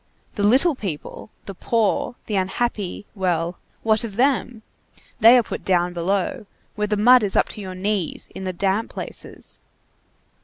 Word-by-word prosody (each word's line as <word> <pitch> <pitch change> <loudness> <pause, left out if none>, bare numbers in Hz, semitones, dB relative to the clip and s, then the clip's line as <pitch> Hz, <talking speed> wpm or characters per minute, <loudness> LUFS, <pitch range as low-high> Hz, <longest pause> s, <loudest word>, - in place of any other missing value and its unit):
The - - -4
little 260 +11 +4
people, 195 - -6 0.2
the 195 - -7
poor, 230 +5 0
the 210 - -3
unhappy, 200 +1 -2
well, 175 -3 -1 0.2
what 220 0 +3
of 215 -4 -6
them? 245 -2 0 0.6
they 230 +3 +8
are 245 - +3
put - - -6
down 180 -1 +1
below, 190 +4 -1 0.3
where 210 0 -2
the 210 0 0
mud 245 +4 +6
is 205 -2 -1
up - - +3
to 210 - -7
your 185 -2 -7
knees, 195 -2 -2
in 190 - -7
the 185 - -2
damp 195 +4 0
places. - - -8
205 Hz, 160 wpm, -22 LUFS, 185-225 Hz, 0.6 s, they